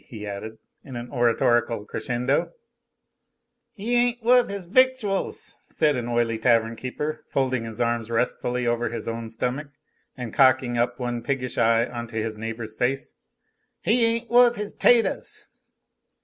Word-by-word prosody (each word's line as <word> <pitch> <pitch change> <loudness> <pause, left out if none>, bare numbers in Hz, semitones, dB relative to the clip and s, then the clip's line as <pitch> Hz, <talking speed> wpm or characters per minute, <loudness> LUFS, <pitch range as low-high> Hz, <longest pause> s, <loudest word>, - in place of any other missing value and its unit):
he 105 -3 -8
added, 105 +2 -6 0.3
in 130 - -9
an 120 0 -7
oratorical 120 -3 +1
crescendo. 125 +5 -1 1.2
"He 225 +4 -3
ain't 240 -1 +1
wuth 245 0 +5
his 200 -2 -5
victuals," 240 -1 +1
said 150 -2 0
an 120 -2 -3
oily 120 0 +2
little - - -15
tavern 115 -1 +3
keeper, 150 +5 -4
folding 130 -3 0
his 115 +1 -6
arms 115 -1 0
restfully 125 +1 -1
over 120 0 0
his 115 -2 -5
own 115 0 -4
stomach 125 +6 -3 0.5
and 125 -3 -6
cocking 130 -2 +4
up 120 +1 0
one 120 -1 -3
piggish 125 0 -2
eye 115 0 +4
into 120 -2 -6
his 110 0 -2
neighbor's 110 0 -5
face. 125 +4 -1 0.7
"He 230 +2 +2
ain't 230 +1 +1
wuth 240 0 +5
his 210 -1 -5
'taters." 235 -2 +2
125 Hz, 150 wpm, -24 LUFS, 115-155 Hz, 1.2 s, wuth